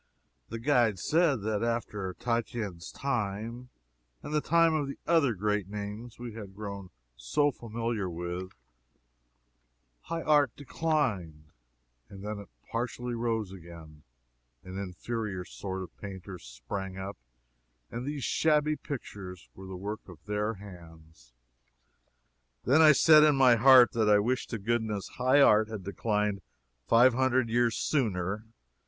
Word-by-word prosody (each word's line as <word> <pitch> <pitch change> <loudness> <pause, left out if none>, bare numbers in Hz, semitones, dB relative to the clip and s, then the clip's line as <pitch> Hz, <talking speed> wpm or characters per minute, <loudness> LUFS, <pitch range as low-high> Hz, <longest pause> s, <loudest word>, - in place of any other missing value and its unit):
The 115 - -4
guide 120 -4 +2
said 150 - +2
that 105 -1 -1
after 115 -5 -2
Titian's 115 -7 -3
time 115 -1 -3 0.5
and 150 - -6
the 150 - +2
time 165 +1 +4
of 150 -3 0
the 140 - -6
other 150 -8 +3
great 105 0 -1
names 105 +3 -6
we 120 -2 -7
had 100 -3 -9
grown 100 -2 -7 0.3
so 60 - +1
familiar 115 -4 -3
with, 90 +2 -5 1.5
high 165 - -5
art 145 -5 +3
declined; 110 - -2 0.6
then 100 +2 -6
it 100 - -11 0.2
partially 120 +1 -3
rose 115 -4 -1
again 85 -4 -12 0.6
an 95 0 -9
inferior 100 0 -4
sort 95 0 -5
of 90 - -12
painters 95 -4 -8
sprang 95 +11 -6
up, 95 -5 -6 0.7
and 120 - -4
these 145 0 -4
shabby 150 +2 +2
pictures 100 - -8
were 95 0 -11
the 95 -1 -7
work 105 +2 -6
of 90 - -11
their 105 +1 -1
hands. 80 -9 -14 1.3
Then 140 +6 +4
I 155 -1 +9
said, 155 +2 +7
in 150 -2 +5
my 130 -3 +6
heat, 125 +1 +7
that 110 -2 +1
I 105 - +7
"wished 125 +5 0
to 115 - -3
goodness 110 -1 -2
high 130 +3 +5
art 110 -5 +6
had 110 -4 -6
declined 105 0 -1 0.5
five 120 +2 +6
hundred 130 -1 +2
years 120 0 +2
sooner." 105 - -1
110 Hz, 135 wpm, -29 LUFS, 95-125 Hz, 1.5 s, I